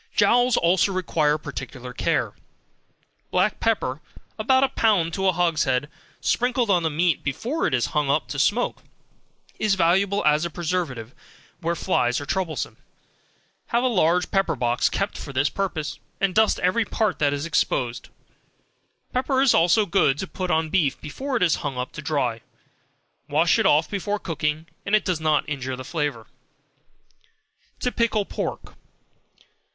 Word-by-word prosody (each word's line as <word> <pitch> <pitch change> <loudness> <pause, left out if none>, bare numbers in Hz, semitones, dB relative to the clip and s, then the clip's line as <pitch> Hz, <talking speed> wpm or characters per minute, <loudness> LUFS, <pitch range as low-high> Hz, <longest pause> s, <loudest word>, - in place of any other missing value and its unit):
Jowls 245 +4 +4
also 180 +3 +3
require 160 -5 +1
particular 125 -4 -7
care; - - 0 1.0
black 185 +3 +1
pepper, 155 - 0 0.4
about 260 +4 +3
a 270 - +3
pound 200 -10 +2
to 190 +2 0
a - - +5
hogshead, 150 -5 0 0.3
sprinkled 245 -2 +1
on 180 -2 +3
the 160 - 0
meat 165 +2 +1
before 235 - -1
it - - -2
is 120 - +1
hung 150 -2 +1
up 140 -3 +1
to 145 +1 -4
smoke, 215 - +1 0.8
is 210 -2 +2
valuable 195 +3 +2
as 150 +1 +4
a 170 - -1
preventive 155 -9 -3 0.5
where 170 +1 -1
flies 125 -10 +1
are 145 - -6
troublesome; 180 -1 -3 0.9
have 235 +1 +1
a - - +3
large 180 -6 +2
pepper 195 -5 +1
box 120 0 +1
kept 195 +1 -2
for 140 - -8
the 135 +3 +2
purpose, 180 -6 -3 0.2
and 195 -2 +1
dust 220 +1 +3
every 185 +6 +2
part 215 -2 -1
that 145 -2 +2
is 145 +1 -2
exposed; 125 -6 -1 1.0
pepper 260 +1 +1
is 265 -2 +5
also 180 +6 +4
good 165 -7 +2
to 190 - -3
put 185 0 -5
on 160 -2 +1
beef 155 -8 +1
before 260 - -3
it 225 - +1
is 170 -4 +3
hung 140 -3 -4
up 125 0 -3
to 150 - -8
dry; 140 -7 -1 0.9
wash 160 +4 +3
it - - +3
off 150 +2 +4
before 205 +2 -2
cooking, 155 -4 -2 0.2
and 200 - +2
it 215 - +1
does 180 -4 0
not 155 -1 +1
injure 130 -3 -3
the 130 0 -8
flavor. 150 -2 -3 1.6
To 250 - 0
Pickle 225 -4 +1
Pork. - - -5
170 Hz, 160 wpm, -24 LUFS, 145-200 Hz, 1.6 s, a